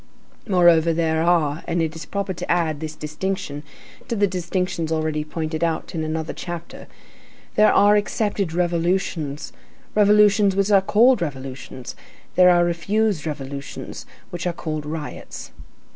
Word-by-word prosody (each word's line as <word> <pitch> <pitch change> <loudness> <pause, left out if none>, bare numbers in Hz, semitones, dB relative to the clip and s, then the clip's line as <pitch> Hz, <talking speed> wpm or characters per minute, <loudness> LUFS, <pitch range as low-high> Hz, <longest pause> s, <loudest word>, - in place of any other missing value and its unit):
Moreover, 170 -4 +5
there 160 -1 +1
are, 165 -3 +2
and 170 0 0
it 160 -1 -1
is 160 -1 -8
proper 200 -1 -2
to - - -4
add 165 -4 +1
this 155 0 -6
distinction 150 -1 -4 0.5
to 235 - -2
the 205 -1 +3
distinctions 180 -2 -2
already 155 -1 -1
pointed 155 +1 -4
out 165 -1 -1
in 160 -2 -2
another 155 0 -3
chapter,—there 175 +4 -3
are 205 +1 +5
accepted 205 -3 0
revolutions, 170 -3 -1 0.4
revolutions 210 -1 +5
which 195 +1 +1
are 195 -1 +6
called 230 +4 +4
revolutions; 130 -4 -6 0.4
there 180 0 +6
are 175 -1 +5
refused 175 +1 0
revolutions, 140 -1 -6 0.2
which 175 0 -3
are 175 - -1
called 155 -3 -4
riots. 155 -1 -7
170 Hz, 135 wpm, -22 LUFS, 155-190 Hz, 0.5 s, are